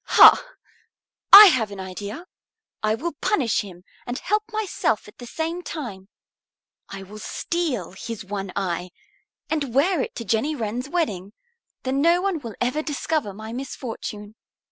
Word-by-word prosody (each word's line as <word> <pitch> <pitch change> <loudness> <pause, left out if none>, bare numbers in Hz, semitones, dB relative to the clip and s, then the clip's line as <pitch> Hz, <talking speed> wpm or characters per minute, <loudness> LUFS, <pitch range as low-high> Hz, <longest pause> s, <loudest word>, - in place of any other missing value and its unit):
Ha! - - +9 0.9
I 410 +2 +13
have 225 -4 0
an 200 -1 -9
idea. 200 - -7 0.6
I 215 0 +1
will 330 +9 -3
punish 265 - +1
him 180 -3 -11 0.2
and 245 +1 -3
help 425 +2 0
myself 395 - -1
at 210 - -16
the 245 - -9
same 330 +6 -3
time. 215 - -7 0.8
I 195 -1 -7
will 210 +3 -11
steal 285 - -3
his 220 +2 -7
one 195 -1 -5
eye 180 -2 -2 0.6
and 285 -6 -2
wear 325 +3 +3
it - - -5
to 230 - -6
Jenny 225 +10 0
Wren's 240 +2 -4
wedding; 210 - -2 0.5
then 265 +2 0
no 340 +3 +4
one 380 -3 -1
will 230 -6 -8
ever 255 +5 0
discover 300 -5 -2
my 220 +3 -8
misfortune." 225 -5 -6
240 Hz, 150 wpm, -23 LUFS, 205-315 Hz, 0.9 s, I